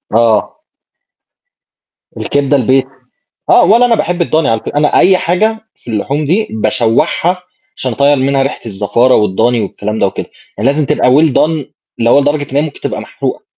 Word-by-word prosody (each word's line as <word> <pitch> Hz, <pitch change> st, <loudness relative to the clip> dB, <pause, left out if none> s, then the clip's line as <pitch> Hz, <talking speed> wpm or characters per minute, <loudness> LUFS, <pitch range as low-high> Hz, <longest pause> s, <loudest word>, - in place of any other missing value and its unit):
آه. 115 Hz, -, +1 dB, 1.6 s
الكبدة 145 Hz, 0 st, 0 dB
البيتي. 130 Hz, +1 st, +1 dB, 0.6 s
آه، -, -, +6 dB
ولا 235 Hz, +3 st, +4 dB
أنا 235 Hz, -, +2 dB
باحب 175 Hz, -4 st, -1 dB
الضاني 160 Hz, -1 st, 0 dB
على 115 Hz, -1 st, 0 dB
فك -, -, -7 dB
أنا 150 Hz, 0 st, +2 dB
أي 185 Hz, 0 st, +5 dB
حاجة 215 Hz, +6 st, 0 dB, 0.2 s
في 120 Hz, -, -11 dB
اللحوم 140 Hz, +8 st, -2 dB
دي 195 Hz, +8 st, +1 dB
باشوّحها 115 Hz, -, 0 dB, 0.3 s
عشان 130 Hz, -2 st, -3 dB
أطيّر 140 Hz, +3 st, +2 dB
منها 135 Hz, +1 st, +1 dB
ريحة 135 Hz, -, -3 dB
الزفارة 105 Hz, +5 st, +1 dB
والضاني 110 Hz, +4 st, +1 dB
والكلام 105 Hz, +1 st, -4 dB
ده -, -, +2 dB
وكده، -, -, -5 dB, 0.3 s
يعني 125 Hz, +6 st, +2 dB
لازم 150 Hz, +1 st, 0 dB
تبقى -, -, +1 dB
Well 150 Hz, +2 st, +4 dB
done 155 Hz, -2 st, 0 dB, 0.3 s
اللي 115 Hz, 0 st, +1 dB
هو 145 Hz, -, +5 dB
لدرجة 145 Hz, 0 st, -1 dB
إنّها 155 Hz, 0 st, -1 dB
تبقى -, -, -3 dB
محروقة، -, -, -5 dB
140 Hz, 165 wpm, -13 LUFS, 115-155 Hz, 1.6 s, آه